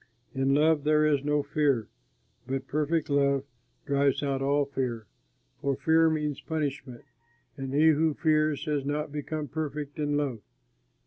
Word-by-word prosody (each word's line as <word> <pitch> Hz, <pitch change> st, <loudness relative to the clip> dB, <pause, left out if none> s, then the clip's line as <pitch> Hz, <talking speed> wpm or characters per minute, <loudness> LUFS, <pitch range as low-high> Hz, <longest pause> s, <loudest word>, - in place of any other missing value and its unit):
In 135 Hz, +1 st, +1 dB
love 155 Hz, 0 st, +3 dB
there 155 Hz, 0 st, +3 dB
is 145 Hz, -3 st, +2 dB
no 150 Hz, 0 st, +1 dB
fear, 140 Hz, -6 st, +1 dB, 0.6 s
but 135 Hz, 0 st, -3 dB
perfect 155 Hz, +2 st, 0 dB
love 140 Hz, -1 st, +2 dB, 0.4 s
drives 140 Hz, 0 st, +1 dB
out 135 Hz, -1 st, -1 dB
all 140 Hz, +1 st, +2 dB
fear, 125 Hz, -5 st, -3 dB, 0.6 s
for 140 Hz, -1 st, 0 dB
fear 160 Hz, +4 st, +3 dB
means 150 Hz, -3 st, -2 dB
punishment, 145 Hz, -6 st, -4 dB, 0.5 s
and 135 Hz, -2 st, -5 dB
he 155 Hz, +3 st, +5 dB
who 155 Hz, 0 st, +2 dB
fears 155 Hz, -2 st, +1 dB
has 150 Hz, -3 st, -1 dB
not 145 Hz, +1 st, -2 dB
become 150 Hz, +1 st, -4 dB
perfect 150 Hz, 0 st, -5 dB
in 145 Hz, -1 st, 0 dB
love. 135 Hz, -6 st, -2 dB
145 Hz, 145 wpm, -28 LUFS, 140-155 Hz, 0.6 s, he